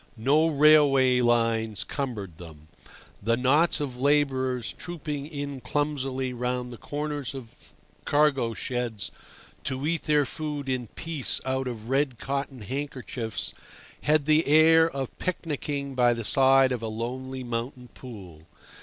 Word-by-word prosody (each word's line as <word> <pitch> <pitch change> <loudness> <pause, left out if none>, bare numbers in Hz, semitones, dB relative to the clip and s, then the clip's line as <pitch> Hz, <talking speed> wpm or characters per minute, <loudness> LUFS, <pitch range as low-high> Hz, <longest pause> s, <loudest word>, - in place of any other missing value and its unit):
No 145 +8 +3
railway 145 -4 +5
lines 115 -3 +1
cumbered 105 - -5
them. 80 -3 -12 0.5
The 115 +3 +1
knots 145 +8 +3
of 130 -4 -4
labourers 130 -4 +1
trooping 150 -4 -5
in 140 -3 -5
clumsily 135 -3 -2
round 125 0 -3
the 120 - -11
corners 145 -2 -4
of 80 - -12 0.3
cargo 140 -6 +2
sheds 120 -4 -3 0.5
to 130 +2 -2
eat 165 +1 0
their 150 -1 +3
food 145 0 -5
in 125 -2 -2
peace 160 +2 -1
out 130 0 -1
of 115 -3 -6
red 135 -1 +1
cotton 135 0 -4
handkerchiefs 130 -2 -4 0.5
had 150 -1 +2
the 155 +1 +3
air 160 +2 +6
of 135 -4 -5
picnicking 145 -5 -3
by 120 -2 +3
the 115 - -4
side 135 +2 +5
of 125 -3 -2
a 115 - -3
lonely 130 +4 -5
mountain 120 +1 -5
pool. 95 -12 -12
130 Hz, 135 wpm, -26 LUFS, 120-145 Hz, 0.5 s, air